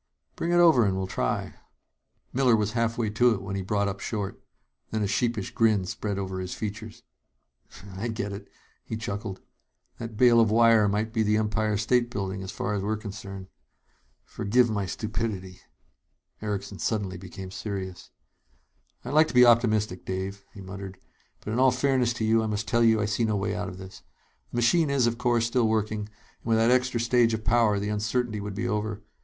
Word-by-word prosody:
"Bring 170 - -2
it - - +3
over 165 -8 +6
and 95 -2 +1
we'll 95 - -1
try 95 - -1
it." - - -11 0.8
Miller 125 -3 +4
was 105 -1 0
halfway 115 -1 0
to 120 +2 +3
it 95 - -7
when 100 0 -4
he 100 - -2
brought 100 +2 0
up 100 0 -4
short. 100 -3 -4 0.5
Then 110 -1 -1
a - - 0
sheepish 110 0 -1
grin 110 -4 +2
spread 100 +2 -3
over 95 -1 -3
his 90 -1 -5
features. 105 -1 -6 0.9
"I 105 +5 -3
get 110 -3 -3
it," 100 - -8 0.4
he 110 - -5
chuckled. 105 -3 -5 0.6
"That 115 -2 -7
bale 120 -1 +6
of 115 -2 +4
wire 115 -1 +5
might 105 +2 -1
be 115 - +1
the 105 0 +2
Empire 110 0 0
State 120 +3 +2
Building, 95 -4 -4
as 95 - -6
far 105 - -3
as 100 - -1
we're 105 +2 -1
concerned. 100 -2 -8 0.8
Forgive 120 +3 +1
my 100 -3 -1
stupidity." 105 -2 -4 0.8
Erickson 100 -2 -4
suddenly 100 -5 -2
became 95 0 -9
serious. 95 -2 -6 1.0
"I'd 125 - -4
like 155 +1 +6
to - - -7
be 125 0 +8
optimistic, 110 -5 +3
Dave," 95 +2 -4
he 100 - -11
muttered, 95 0 -8 0.5
"but 105 - -3
in 120 - 0
all 130 0 +6
fairness 125 -1 +1
to 115 -2 -2
you 110 +1 +3
I 110 - -1
must 105 0 -3
tell 115 +3 +2
you 110 -1 +4
I 105 - +1
see 110 +2 0
no 110 -2 +1
way 100 0 -1
out 105 -2 -3
of 90 - -9
this. 95 0 -11 0.5
The - - -10
machine 140 +7 +3
is, 140 -3 +2
of 120 0 -1
course, 120 -2 +2
still 115 0 +2
working, 110 -1 0
and 105 0 -13
with 115 -1 +2
that 115 +2 +4
extra 125 -1 +2
stage 115 -1 +3
of 110 - -8
power, 115 -2 +3
the 100 +1 -2
uncertainty 105 +1 -1
would 100 -1 -5
be - - -2
over. 105 0 -2
110 Hz, 195 wpm, -27 LUFS, 100-115 Hz, 1.0 s, be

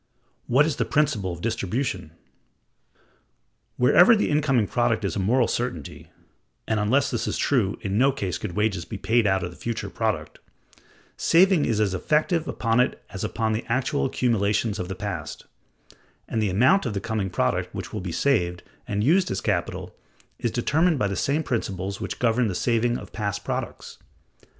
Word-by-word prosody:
What 135 +5 +4
is 155 -3 -2
the - - +1
principle 125 -11 0
of 85 0 -7
distribution? 110 - -2 1.7
Wherever 175 - +6
the 210 - 0
incoming 140 -6 +2
product 95 - 0
is - - -2
a - - -1
moral 115 +5 +2
certainty 120 - -4 0.6
(and, 110 -1 +1
unless 135 +7 +2
this - - -2
is - - -1
true, 115 -9 +1
in 100 +2 -1
no 135 +2 +5
case 95 -10 -3
could 100 -5 -5
wages 105 -3 0
be 105 - -7
paid 115 +2 +2
out 95 -1 +1
of 90 - -4
the - - -13
future 115 -1 -4
product), - - -2 0.8
saving 180 -1 +4
is 110 -3 0
as 105 -3 +1
effective 155 - +1
upon 115 +1 0
it 125 - +1
as 95 - -5
upon 110 +1 -1
the 110 - -2
actual 130 +4 0
accumulations 105 -4 0
of 90 - -3
the 95 - -5
past; 90 -6 -5 0.8
and 110 - -1
the 105 - +1
amount 130 - +3
of 105 - -4
the - - 0
coming 105 -2 -2
product 75 -8 -1
which - - -6
will 105 - -3
be 90 -1 -5
saved 90 -6 0 0.2
and 105 0 -1
used 180 - +3
as - - -2
capital - - -2 0.4
is 120 - 0
determined 155 +8 +1
by 105 - 0
the 100 - -3
same 145 - 0
principles 100 - -3
which - - -4
govern 120 0 +2
the 95 - -3
saving 120 +2 +1
of - - -11
past 105 -2 -3
products. - - -5
110 Hz, 180 wpm, -25 LUFS, 100-135 Hz, 1.7 s, Wherever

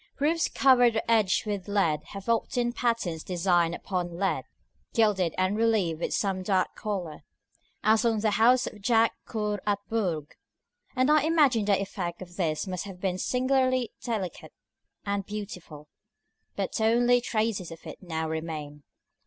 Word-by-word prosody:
Roofs 325 +4 +1
covered 245 -3 +4
or 220 - 0
edged 220 -4 +2
with 205 -3 -3
lead 180 -7 +1
have 195 +1 -9
often 240 +1 0
patterns 230 -11 -1
designed 175 -2 +1
upon 180 -2 -3
the 170 - -10
lead, 195 +2 -1 0.5
gilded 205 -7 +2
and 185 +2 +1
relieved 215 -8 +1
with - - -2
some 195 -2 0
dark 185 -1 0
color, 190 -8 -4 0.6
as 220 +2 +4
on 225 -2 +2
the 215 -1 +2
house 245 +4 +4
of 210 - -8
Jaques 225 +1 +3
Coeur 210 -3 -2
at 205 -1 +2
Bourges; 175 -10 -2 0.6
and 260 +3 +3
I 305 0 +5
imagine 290 -8 +3
the 200 -1 +3
effect 185 -3 -4
of 175 -1 -14
this 160 -3 -1
must 185 -1 -4
have 190 -3 -9
been 185 -1 -2
singularly 255 0 +1
delicate 215 -7 -4 0.5
and 200 0 -1
beautiful, 180 -7 -8 0.7
but - - -2
only 240 +2 +4
traces 215 -6 -1
of 165 -1 -11
it - - -9
now 160 -3 -3
remain. 155 -2 -5
205 Hz, 155 wpm, -27 LUFS, 180-230 Hz, 0.7 s, I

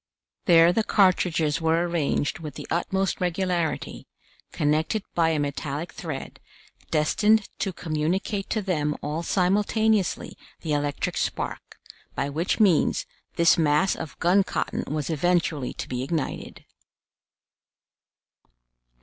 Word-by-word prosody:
There 170 -1 +6
the 225 - +1
cartridges 175 -7 +2
were 165 +2 +2
arranged 160 -2 -1
with 150 -4 -7
the - - -7
utmost 190 +3 0
regularity, 180 -2 -2 0.4
connected 155 +8 0
by 165 -1 +3
a 160 - +1
metallic 145 +2 -3
thread, 155 -7 -6 0.5
destined 210 +8 +3
to 195 - -1
communicate 180 +5 -2
to 215 - -1
them 150 -6 0
all 150 +3 -2
simultaneously 205 +3 +1 0.3
the 155 -3 -2
electric 145 -1 -1
spark, - - -3 0.4
by 140 - -1
which 160 +9 -1
means 190 -8 +3 0.3
this 170 0 +4
mass 155 +4 +3
of 155 - -7
gun 185 +4 +4
cotton - - -3
was 150 +1 -2
eventually 160 -4 0
to - - -6
be 125 -1 -3
ignited. 150 +3 -4
165 Hz, 115 wpm, -25 LUFS, 150-185 Hz, 0.5 s, There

